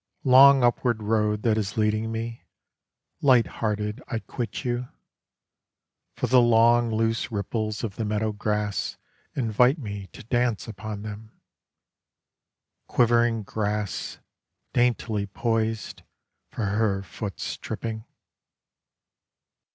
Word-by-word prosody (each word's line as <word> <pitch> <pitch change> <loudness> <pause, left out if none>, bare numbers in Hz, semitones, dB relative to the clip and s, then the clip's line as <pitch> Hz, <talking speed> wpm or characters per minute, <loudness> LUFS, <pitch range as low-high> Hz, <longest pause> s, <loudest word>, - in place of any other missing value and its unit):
Long 135 0 +7
upward 120 -2 +1
road 105 -1 +1
that 110 -2 +2
is 105 +1 -4
leading 110 +1 +1
me, 115 +1 -5 0.8
Light 125 -4 +5
hearted 105 -1 -3
I 115 - -2
quit 115 +4 -5
you, 120 0 -1 1.3
For - - -1
the 125 -1 +5
long 120 0 +4
loose 115 +1 0
ripples 110 +1 -3
of 105 -4 -4
the 115 - -1
meadow 110 +1 0
grass 105 -1 -2 0.4
Invite 125 +3 +3
me 100 -7 -6
to - - -13
dance 120 -1 0
upon 110 -2 -6
them. 110 +1 -9 1.5
Quivering 120 -2 +3
grass 105 0 -3 0.6
Daintily 115 -4 +1
poised 115 +1 -2 0.5
For 110 - -3
her 100 -1 0
foot's 100 0 -5
tripping. 110 -1 -5
110 Hz, 105 wpm, -25 LUFS, 105-120 Hz, 1.5 s, Long